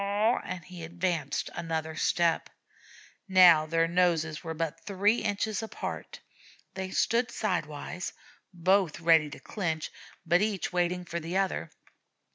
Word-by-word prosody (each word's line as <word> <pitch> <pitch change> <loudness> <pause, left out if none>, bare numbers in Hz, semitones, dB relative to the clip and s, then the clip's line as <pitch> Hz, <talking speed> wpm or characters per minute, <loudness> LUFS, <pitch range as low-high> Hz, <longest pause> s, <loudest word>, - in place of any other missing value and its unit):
and 180 -2 -5
he 180 -2 -9
advanced 165 -4 -2
another 160 -2 -3
step. 170 +1 +1 0.8
Now 175 -5 +7
their 165 +1 +2
noses 165 -3 +1
were 160 -1 -4
but 165 -1 -3
three 205 +3 +2
inches 210 0 -1
apart; 225 - -6 0.5
they 190 0 -4
stood 235 +5 +1
sidewise, 180 -5 -3 0.4
both 180 -1 +2
ready 165 -2 +4
to 145 - -9
clinch, 160 -6 -3 0.3
but 175 +2 +3
each 205 -4 -1
waiting 180 0 0
for 170 0 -4
the 170 +3 -3
other. 190 - -1
175 Hz, 125 wpm, -29 LUFS, 160-190 Hz, 0.8 s, Now